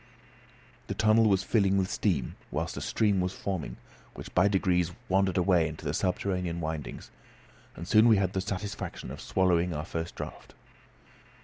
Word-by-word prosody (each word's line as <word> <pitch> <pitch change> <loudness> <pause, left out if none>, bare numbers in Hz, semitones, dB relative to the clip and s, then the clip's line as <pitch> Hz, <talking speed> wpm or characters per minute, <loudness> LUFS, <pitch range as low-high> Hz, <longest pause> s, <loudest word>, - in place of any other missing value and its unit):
The - - -3
tunnel 110 0 +4
was 95 -1 +2
filling 100 -3 +2
with 95 -1 +1
steam, 85 - -1
whilst - - -3
a - - -5
stream 100 -4 +1
was 90 +1 -1
forming, 80 -12 -4 0.4
which - - -9
by 90 +2 +4
degrees 90 -3 +1 0.2
wandered 95 0 +2
away 90 -3 +3
into 75 -1 -5
subterranean 90 -1 -1
windings, 80 -4 -5 0.6
and 85 - -8
soon 110 +3 +6
we 110 -3 +6
had 95 -1 0
the 95 - 0
satisfaction 100 0 -5
of - - -8
swallowing 90 -2 +1
our 75 +1 -3
first 80 0 -5
draught. - - -8
95 Hz, 155 wpm, -29 LUFS, 85-100 Hz, 0.6 s, soon